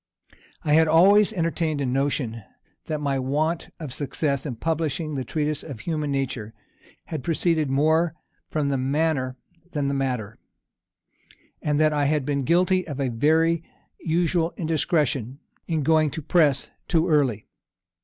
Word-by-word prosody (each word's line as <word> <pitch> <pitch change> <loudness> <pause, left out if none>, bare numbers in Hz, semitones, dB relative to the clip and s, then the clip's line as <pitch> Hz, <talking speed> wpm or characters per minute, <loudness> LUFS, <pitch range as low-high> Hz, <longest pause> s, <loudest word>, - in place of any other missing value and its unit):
I 150 - +1
had 160 +1 +5
always 200 +7 +6
entertained 165 -5 -1
a 140 - 0
notion, 130 -3 -1 0.5
that 155 -1 -2
my 140 -2 0
want 150 +6 -1
of 150 -6 -6
success 140 0 -2
in 125 - -4
publishing 155 +2 -2
the 135 -2 -2
Treatise 150 +1 -2
of 135 -9 -8
Human 150 +2 -2
Nature 130 -5 -3 0.5
had 155 -5 -5
proceeded 160 -2 +1
more 160 +4 +2 0.3
from 150 -2 0
the 135 -1 0
manner 135 -1 0 0.4
than 145 -3 0
the - - -1
matter, 125 -6 -2 1.2
and 150 -1 0
that 155 0 +4
I 145 -1 +1
had 150 -1 +1
been 140 -2 -1
guilty 185 +3 +2
of 145 -3 -5
a 135 -2 0
very 160 +7 +2 0.4
usual 170 0 0
indiscretion, 150 - 0 0.3
in 160 -3 0
going 155 +1 +3
to 160 - -6
the - - -20
press 150 -6 +2 0.2
too 165 0 +2
early. 135 - +2
150 Hz, 150 wpm, -24 LUFS, 135-160 Hz, 1.2 s, always